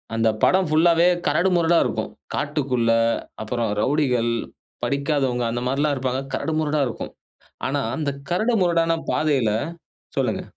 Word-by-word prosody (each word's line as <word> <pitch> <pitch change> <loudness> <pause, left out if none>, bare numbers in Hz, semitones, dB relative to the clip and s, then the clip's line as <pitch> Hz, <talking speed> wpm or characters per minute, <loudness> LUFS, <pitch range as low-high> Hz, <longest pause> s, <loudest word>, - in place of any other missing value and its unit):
அந்த 115 0 +3
படம் 185 -3 +4
புல்லாவே 170 +2 +5 0.2
கரடு 170 +6 +2
முரடா 170 0 +3
இருக்கும். - - -3 0.2
காட்டுக்குள்ளே, 125 -6 +1 0.4
அப்புறம் 115 +1 -2
ரவுடிகள், 125 -3 +1 0.5
படிக்காதவங்க 140 -4 0
அந்த 120 +1 -2
மாரிலாம் 140 +3 +1
இருப்பாங்க. 130 0 -2
கரடு 160 - -2
முரடா 150 -1 0
இருக்கும். - - -6 0.6
ஆனா 140 +2 0 0.2
அந்த 150 -3 -1 0.2
கரடு 215 +7 +1
முரடான 170 -2 +2 0.2
பாதையில 140 -8 +1 0.7
சொல்லுங்க. - - 0
145 Hz, 125 wpm, -23 LUFS, 125-165 Hz, 0.7 s, புல்லாவே